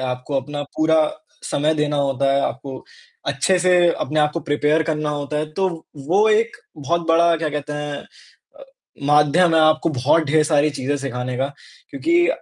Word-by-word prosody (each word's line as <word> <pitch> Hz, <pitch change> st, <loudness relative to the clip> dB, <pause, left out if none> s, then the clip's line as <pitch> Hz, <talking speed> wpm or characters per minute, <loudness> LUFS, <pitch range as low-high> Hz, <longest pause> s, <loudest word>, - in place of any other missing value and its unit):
आपको 130 Hz, +2 st, -3 dB
अपना 145 Hz, +2 st, -6 dB
पूरा 160 Hz, +1 st, +3 dB, 0.5 s
समय 155 Hz, +2 st, +1 dB
देना 150 Hz, -1 st, -1 dB
होता 135 Hz, -1 st, +1 dB
है, 140 Hz, -, +2 dB
आपको 135 Hz, +1 st, -4 dB, 0.5 s
अच्छे 190 Hz, -1 st, +1 dB
से 180 Hz, 0 st, +3 dB, 0.2 s
अपने 155 Hz, 0 st, -2 dB
आप 150 Hz, 0 st, +2 dB
को 170 Hz, -, -3 dB
प्रिपेयर 150 Hz, +2 st, +1 dB
करना 150 Hz, -1 st, -2 dB
होता 145 Hz, 0 st, -4 dB
है। 155 Hz, +1 st, -3 dB
तो 190 Hz, +4 st, 0 dB, 0.4 s
वो 205 Hz, +5 st, +4 dB
एक 225 Hz, +2 st, +1 dB, 0.2 s
बहुत 170 Hz, +4 st, -2 dB
बड़ा 170 Hz, +1 st, +4 dB
क्या 160 Hz, -1 st, -2 dB
कहते 150 Hz, 0 st, -5 dB
हैं 145 Hz, -1 st, -4 dB, 0.6 s
अ, -, -, -12 dB, 0.4 s
माध्यम 150 Hz, +4 st, +4 dB
है 160 Hz, -, +5 dB
आपको 155 Hz, +1 st, +3 dB
बहुत 145 Hz, +4 st, +2 dB
ढेर 155 Hz, +2 st, +3 dB
सारी 150 Hz, -1 st, +2 dB
चीज़ें 145 Hz, 0 st, -2 dB
सिखाने 125 Hz, -2 st, -4 dB
का 135 Hz, +2 st, -1 dB, 0.4 s
क्योंकि 340 Hz, +5 st, +1 dB
150 Hz, 175 wpm, -20 LUFS, 140-165 Hz, 0.6 s, है